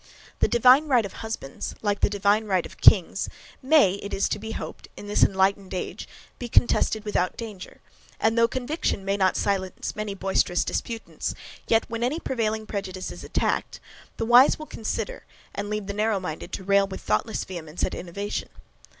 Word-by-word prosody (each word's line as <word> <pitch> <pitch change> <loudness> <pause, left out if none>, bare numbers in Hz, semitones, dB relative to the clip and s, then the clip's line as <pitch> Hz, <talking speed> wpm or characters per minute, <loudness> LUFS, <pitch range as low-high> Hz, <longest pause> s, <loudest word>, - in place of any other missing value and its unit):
The - - +4
DIVINE 255 +5 +5
RIGHT 245 -6 +3
of 195 - -7
husbands, 220 -12 -6
like 205 -1 0
the - - +3
divine 205 +2 +2
right 190 -4 +1
of - - -13
kings, - - +5 0.3
may, 260 -9 +4
it 200 - -4
is 195 - +1
to - - -2
be 220 +1 -6
hoped, - - -7
in - - -8
this 205 0 0
enlightened 190 0 +2
age, 180 - -5 0.3
be 245 - -5
contested 220 -2 +3
without 185 -3 0
danger, 215 -5 -8 0.4
and 225 +1 +2
though 230 0 +5
conviction 260 -4 -2
may 195 0 +1
not 190 -2 +2
silence 190 -2 -2
many 210 -2 -4
boisterous 190 -2 +1
disputants, 230 -1 -4 0.3
yet, 225 0 +3
when 230 0 -5
any 275 +7 0
prevailing 220 -6 -2
prejudice 190 -3 -5
is - - -9
attacked, - - -1 0.4
the 225 - -1
wise 245 +4 +7
will 310 - -8
consider, 405 - -4 0.3
and 205 0 -4
leave 210 -1 -2
the 200 - -4
narrow 210 0 +1
minded 175 0 -6
to 190 - -4
rail 200 +1 +3
with 190 - -7
thoughtless 105 0 -1
vehemence 170 -3 -6
at - - -1
innovation. 200 +4 -4
205 Hz, 180 wpm, -25 LUFS, 190-230 Hz, 0.4 s, wise